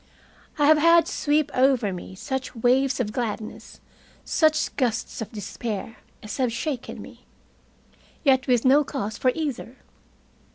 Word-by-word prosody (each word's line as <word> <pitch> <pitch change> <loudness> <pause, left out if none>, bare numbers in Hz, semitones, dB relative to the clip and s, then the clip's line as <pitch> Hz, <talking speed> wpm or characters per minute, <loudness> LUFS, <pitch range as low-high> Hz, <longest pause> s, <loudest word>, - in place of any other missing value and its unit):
I 295 - +3
have 305 +1 +6
had 335 +1 +5
sweep 300 -4 0
over 255 -6 +2
me 180 +1 -8
such 265 +5 -4
waves 255 +3 +2
of 215 -4 -1
gladness, 220 -2 -5 0.5
such 310 -1 +1
gusts 245 -3 -2
of 220 - -6
despair, 215 +1 -5 0.3
as 215 - -6
have 255 -3 +1
shaken 255 +2 -4
me. - - -13 1.0
Yet 265 -3 +3
with 245 -2 +2
no 280 +3 +6
cause 220 -7 -5
for 255 - +3
either. 280 -5 -4
255 Hz, 135 wpm, -24 LUFS, 225-290 Hz, 1.0 s, have